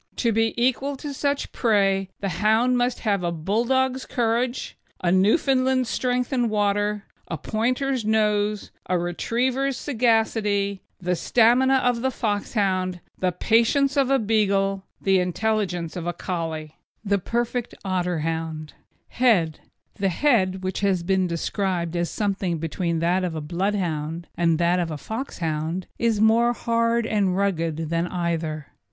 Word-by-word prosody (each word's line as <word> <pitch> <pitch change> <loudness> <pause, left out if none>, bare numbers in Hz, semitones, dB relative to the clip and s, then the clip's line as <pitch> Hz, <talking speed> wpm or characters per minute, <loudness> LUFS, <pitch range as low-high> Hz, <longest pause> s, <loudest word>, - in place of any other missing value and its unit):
To 235 - +1
be 225 +1 +1
equal 260 +3 +1
to 285 +1 -6
such 280 +1 -1
prey, 195 -4 +2
the 200 - -1
hound 220 +8 +2
must 245 0 0
have 200 -5 0
a 170 - 0
Bulldog's 240 +10 0
courage, 240 +1 -1 0.3
a 175 - +2
Newfoundland's 255 - +2
strength 250 +1 -1
in 245 -3 +1
water, 205 0 0 0.2
a 165 - -4
Pointer's 250 - -1
nose, 210 -1 +1 0.2
a 180 - +2
Retriever's 245 +10 -1
sagacity, 220 -6 +1 0.2
the 180 0 0
stamina 245 +7 +4
of 245 -2 +1
the 265 - +1
Foxhound, 200 -5 -1 0.2
the 185 -1 +1
patience 235 - +2
of 275 -2 +2
a 275 - +4
Beagle, 200 -4 +1
the 195 -1 +3
intelligence 180 -2 -1
of 175 -1 -4
a 175 - -1
Collie. 160 -3 -4 0.3
THE 200 0 +2
PERFECT 240 +4 -2
OTTERHOUND: 165 -4 -2 0.4
HEAD 190 -11 +2 0.4
The 195 -1 +2
head, 190 - +1
which 185 0 -2
has 195 -3 +1
been 190 0 +1
described 175 0 -2
as 170 0 0
something 195 -4 -1
between 165 +1 -2
that 180 +2 +2
of 175 -3 -2
a - - -2
Bloodhound 170 -1 -2
and 165 -2 +2
that 175 +2 +2
of 170 -2 -1
a 155 - -4
Foxhound, 165 - -3
is 230 -3 +1
more 230 +2 +4
hard 230 0 +1
and 195 -4 +1
rugged 165 -5 -1
than 170 +1 0
either. 165 -4 -2
200 Hz, 140 wpm, -24 LUFS, 175-235 Hz, 0.4 s, stamina